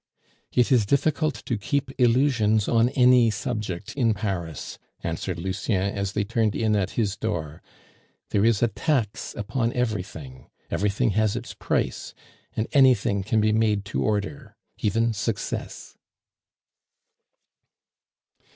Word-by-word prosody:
"It 125 +1 +2
is 115 -6 +4
difficult 150 +2 +1
to 115 - -2
keep 140 +4 -1
illusions 115 -4 +3
on 115 +1 +3
any 125 -2 +6
subject 105 -6 -4
in 115 -6 +2
Paris," 90 - -4 0.2
answered - - -3
Lucien 95 +2 -1
as 100 -1 -2
they 105 - 0
turned 110 0 0
in 110 -1 +1
at 100 -1 -1
his 105 -3 +1
door. 85 -9 -4 0.7
"There 100 - +2
is 115 -1 +3
a - - +5
tax 120 -3 -1
upon 115 +3 -1
everything 90 - -4 0.2
everything 105 +4 +1
has 110 +1 +1
its - - -5
price, - - -2 0.4
and 110 - 0
anything 125 -8 +4
can 110 +3 +1
be 110 0 +3
made 105 -2 +1
to - - 0
order 110 +3 -2 0.2
even 115 +2 +1
success." 105 0 -4
110 Hz, 125 wpm, -25 LUFS, 100-120 Hz, 0.7 s, any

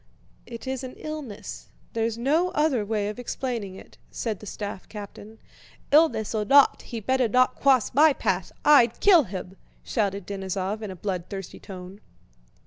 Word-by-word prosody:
"It 235 +1 -8
is 265 0 -3
an 255 - -7
illness, 300 -9 -7 0.3
there's 225 0 -1
no 305 +9 +2
other 295 -7 +2
way 205 -1 -1
of 210 +4 -5
explaining 240 -6 -4
it," - - -14
said 220 -4 -4
the 210 - -11
staff 200 -1 -6
captain. 210 +1 -10 0.5
"Illness 295 -9 +4
or 215 -1 0
not, 275 +6 +5
he'd 225 -4 -7
better 260 -2 +2
not 255 +3 +3
cwoss 265 -4 +3
my 305 +4 +6
path. - - -1
I'd 245 -6 +6
kill 355 -8 +6
him!" 185 -1 -7 0.3
shouted 200 -4 -1
Denísov 195 +1 -3
in 215 - -5
a 190 - -7
bloodthirsty 190 0 -5
tone. 185 +1 -10
225 Hz, 155 wpm, -25 LUFS, 200-265 Hz, 0.5 s, my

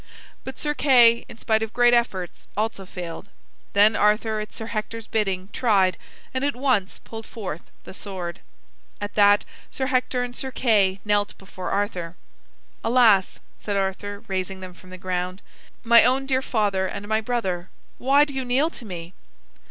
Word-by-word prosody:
But 265 - -7
Sir 295 0 -1
Kay, 240 -5 +5
in - - -11
spite 220 -1 +1
of 220 0 -3
great 240 0 +5
efforts, 195 -7 -1
also 210 -3 -2
failed. 180 +1 -7 0.4
Then 205 +1 +5
Arthur, 215 +1 +2
at 215 0 -6
Sir 220 - -5
Hector's 225 0 -4
bidding, 195 -4 -1
tried, 195 -6 +3 0.4
and 260 +1 -1
at 285 -2 0
once 250 -7 0
pulled 225 -1 -9
forth 190 -7 -6 0.2
the - - -10
sword. 185 -4 -6 0.6
At 205 0 -5
that 205 0 +5 0.2
Sir 265 - -2
Hector 255 -1 0
and 245 0 -6
Sir 265 - -2
Kay 210 -7 +2
knelt 205 0 +1
before 190 -1 -7
Arthur. 180 -5 -2 0.7
"Alas," 225 -5 +4 0.2
said 205 -1 -3
Arthur, 200 +1 -3
raising 190 0 -3
them 185 -1 -9
from 185 +1 -17
the 185 - -9
ground, 185 0 -3 0.4
"my 235 0 +7
own 260 +3 +2
dear 265 -1 +1
father 205 -7 0
and 200 +2 -6
my 220 +1 +1
brother, 190 -7 -2 0.3
why 280 +3 +5
do 285 - -8
you 265 -1 -2
kneel 265 +6 +1
to 245 - -8
me?" 175 -3 -7
210 Hz, 165 wpm, -24 LUFS, 190-245 Hz, 0.7 s, my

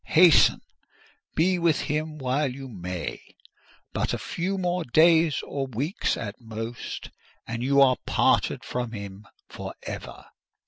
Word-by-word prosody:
hasten! 170 -1 +7 0.8
be 180 +2 +3
with 170 -3 +2
him 155 +1 -2
while 135 +1 0
you 135 +1 -8
may: 90 -6 -5 0.7
but - - 0
a - - -3
few 190 +3 -3
more 180 -1 0
days 160 +3 +4
or 135 -1 -3
weeks, 135 - -1
at 105 +3 -6
most, 115 +1 -6 0.3
and 115 0 -4
you 140 +2 +3
are 130 -2 +6
parted - - +2
from 120 -2 -3
him 100 -1 -8 0.2
for - - -7
ever!" - - -7
135 Hz, 135 wpm, -26 LUFS, 115-160 Hz, 0.8 s, hasten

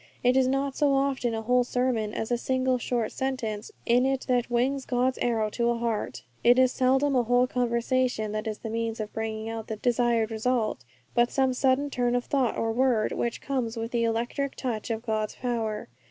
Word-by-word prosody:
It 250 +1 +4
is 265 -1 +4
not 270 +1 0
so 285 -2 +3
often 270 -4 0
a 225 - -4
whole 250 +2 +3
sermon 245 -3 0
as 220 +2 -4
a 240 - +2
single 260 0 +1
short 235 -2 -1
sentence 230 -5 -3
in 245 +2 +4
it 265 0 0
that 245 -2 +1
wings 260 +3 +1
God's 255 0 0
arrow 220 -3 0
to 235 +1 0
a 235 - +1
heart. 210 - -2 0.2
It 240 +1 +6
is 255 -1 +5
seldom 270 +2 +2
a 250 - +4
whole 245 +1 +3
conversation 245 -2 0
that 215 +1 -3
is 215 -1 -3
the 225 - -6
means 230 0 -2
of 215 -1 -5
bringing 220 0 -3
about 225 -1 -6
the 220 - -3
desired 235 -1 +1
result, 225 - -1 0.3
but 240 0 +3
some 265 -1 +1
sudden 265 +2 +1
turn 245 -1 +1
of 245 - 0
thought 265 -5 0
or 225 - 0
word, 240 -2 +2
which 235 -1 -2
comes 250 -4 -2
with 230 +1 -4
the 235 -1 +1
electric 240 +5 -1
touch 235 -5 -3
of 225 0 -2
God's 215 -2 -1
power. 225 -4 -2
240 Hz, 205 wpm, -27 LUFS, 225-255 Hz, 0.3 s, It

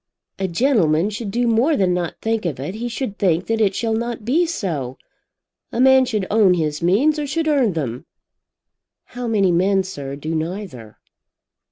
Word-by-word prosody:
"A 190 - 0
gentleman 185 - +2
should 215 0 -5
do 240 +4 0
more 245 +7 +2
than 185 -4 +2
not 175 -2 -2
think 225 0 0
of 150 -6 -4
it. 145 +7 -4
He 235 +3 -4
should 235 -3 -5
think 180 -2 +1
that 225 0 -1
it 195 -3 +2
shall 225 -1 -1
not 230 -1 -3
be 325 +9 +2
so. 155 - -3 0.7
A - - -3
man 265 0 +6
should 215 -6 -2
own 205 -4 +4
his 155 -2 -2
means 250 - +2
or 295 - -3
should 325 +3 -1
earn 270 -9 +2
them." 135 -2 -4 1.1
"How 245 -1 -4
many 200 -5 +2
men, 190 +3 +2
sir, 140 -7 -6
do 155 +3 -5
neither?" 160 - -5
200 Hz, 180 wpm, -20 LUFS, 170-240 Hz, 1.1 s, man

